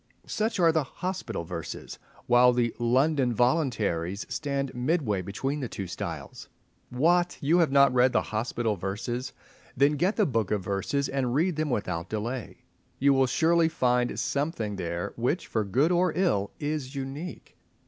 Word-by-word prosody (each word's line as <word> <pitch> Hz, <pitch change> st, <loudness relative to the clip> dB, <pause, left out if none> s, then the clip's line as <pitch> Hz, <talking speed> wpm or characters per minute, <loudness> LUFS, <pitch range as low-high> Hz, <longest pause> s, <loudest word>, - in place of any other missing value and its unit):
Such 215 Hz, -1 st, -1 dB
are 165 Hz, -2 st, +5 dB
the 160 Hz, -2 st, +1 dB
"Hospital 180 Hz, -, -4 dB
Verses," 80 Hz, -, -7 dB, 0.3 s
while 125 Hz, +1 st, +5 dB
the 120 Hz, -1 st, +1 dB
"London 130 Hz, +2 st, +2 dB
Voluntaries" 110 Hz, -, 0 dB
stand 140 Hz, -2 st, -2 dB
midway 125 Hz, -, 0 dB
between 135 Hz, +10 st, -3 dB
the 130 Hz, -5 st, -4 dB
two 100 Hz, -, -5 dB
styles. 90 Hz, -, -6 dB, 0.4 s
What! 175 Hz, +7 st, +2 dB
you 160 Hz, +5 st, +3 dB
have 165 Hz, -5 st, +3 dB
not 140 Hz, -2 st, +5 dB
read 125 Hz, +1 st, +4 dB
the -, -, +2 dB
"Hospital 110 Hz, 0 st, -1 dB
Verses!" 120 Hz, +7 st, -4 dB, 0.5 s
Then 140 Hz, +3 st, +5 dB
get 185 Hz, +8 st, +1 dB
the 210 Hz, -, +3 dB
"Book 115 Hz, -, 0 dB
of 105 Hz, -3 st, -1 dB
Verses" 100 Hz, +9 st, -1 dB
and 130 Hz, -3 st, -1 dB
read 170 Hz, +3 st, +2 dB
them 155 Hz, 0 st, -1 dB
without 95 Hz, -7 st, -2 dB
delay. 115 Hz, +3 st, -4 dB, 0.3 s
You 140 Hz, +1 st, +4 dB
will 135 Hz, -1 st, +3 dB
surely 165 Hz, +4 st, +3 dB
find 125 Hz, -5 st, +1 dB
something 140 Hz, -, -2 dB
there 85 Hz, -2 st, -4 dB
which, 125 Hz, +9 st, 0 dB
for 110 Hz, -, -1 dB
good 130 Hz, -, +2 dB
or 180 Hz, 0 st, +3 dB
ill, 105 Hz, -, +1 dB
is 145 Hz, -2 st, -3 dB
unique. 140 Hz, +6 st, -6 dB
130 Hz, 160 wpm, -27 LUFS, 110-155 Hz, 0.5 s, are